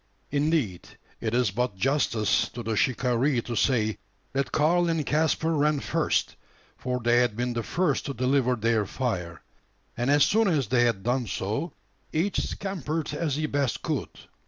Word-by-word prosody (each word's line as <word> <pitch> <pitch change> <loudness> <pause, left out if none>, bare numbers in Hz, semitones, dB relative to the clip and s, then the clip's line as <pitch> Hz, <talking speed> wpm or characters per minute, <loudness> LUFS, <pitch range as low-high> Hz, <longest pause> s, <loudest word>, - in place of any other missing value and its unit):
Indeed, 145 - 0 0.3
it 115 0 -2
is 125 -5 +2
but 125 0 -1
justice 115 -1 +1
to 120 - -7
the 110 0 -1
shikaree 125 +2 +1
to 120 - -4
say, 110 -3 +1 0.3
that 140 0 -1
Karl 170 +3 +3
and 160 -3 0
Caspar 160 +1 +1
ran 150 -1 +2
first: - - 0 0.4
for 125 -1 -3
they 120 0 +3
had 120 -3 +2
been 125 0 -1
the 120 - -1
first 175 +9 0
to 140 - -3
deliver 125 +1 +2
their 110 -2 +1
fire; 90 - -3 0.5
and 120 +3 -1
as 145 0 +5
soon 225 +1 +3
as 145 - +1
they 120 -1 +4
had 110 -5 0
done 125 0 0
so, 110 - -3 0.4
each 175 +6 0
scampered 165 -6 -3
as 150 -2 -1
he 155 +1 -1
best 140 -5 -1
could. - - -2
130 Hz, 165 wpm, -26 LUFS, 115-150 Hz, 0.5 s, as